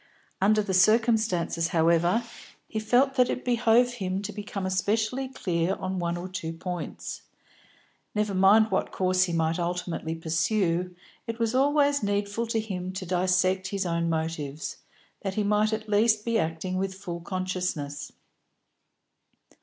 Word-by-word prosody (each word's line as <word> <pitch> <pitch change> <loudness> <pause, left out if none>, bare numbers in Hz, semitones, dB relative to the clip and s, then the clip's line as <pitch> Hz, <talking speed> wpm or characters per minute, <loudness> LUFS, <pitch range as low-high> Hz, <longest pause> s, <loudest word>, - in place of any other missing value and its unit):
Under 215 +2 +4
the 195 -2 -2
circumstances, 215 -5 +3
however, 170 +7 +3 0.4
he 220 - -3
felt 250 +5 +3
that 250 -1 +4
it - - -3
behoved 245 0 +3
him 185 0 -1
to 210 +1 -5
become 205 -1 -5
especially 215 +7 0
clear 180 -7 -1
on 185 0 -3
one 170 0 -1
or 175 +1 -5
two 175 -3 -5
points; 175 +1 -6 0.9
never 210 -1 0
mind 200 +3 +5
what 190 - 0
course 185 0 +2
he 175 - -4
might 165 +1 0
ultimately 175 -2 -2
pursue, 170 +2 0 0.3
it 230 0 -4
was 230 -1 0
always 285 +1 +3
needful 205 +3 -1
to 225 0 0
him 185 -4 -4
to 185 0 -5
dissect 185 +1 +1
his 195 -1 -2
own 170 -1 0
motives, 160 -2 -3 0.4
that 195 -1 -3
he 215 - +1
might 210 +1 +2
at 220 0 -3
least 215 +1 +3
be 230 -1 +1
acting 165 +3 -2
with 190 0 -2
full 180 -3 -6
consciousness. 180 -6 -3
190 Hz, 145 wpm, -27 LUFS, 175-220 Hz, 0.9 s, mind